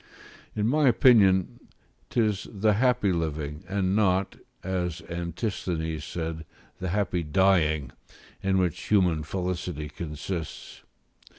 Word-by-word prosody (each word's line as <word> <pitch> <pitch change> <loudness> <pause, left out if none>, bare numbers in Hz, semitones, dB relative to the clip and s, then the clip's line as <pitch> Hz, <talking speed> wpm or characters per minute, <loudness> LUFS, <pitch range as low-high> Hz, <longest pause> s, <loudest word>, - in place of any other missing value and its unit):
In 105 - 0
my 145 +3 +3
opinion, 100 -7 +5 0.5
'tis 105 -4 0
the 105 +1 +2
happy 125 -2 +2
living, 75 -2 -3
and 95 -1 0
not 95 -2 +2 0.3
(as 90 -3 -2
Antisthenes' 85 -2 -3
said) 80 -1 -4 0.4
the 95 - -3
happy 90 -2 0
dying, 75 -4 +2 0.5
in 95 0 +1
which 90 -3 -1
human 90 -7 +3
felicity 90 -2 -3
consists. 80 +2 -6
90 Hz, 105 wpm, -27 LUFS, 80-100 Hz, 0.5 s, opinion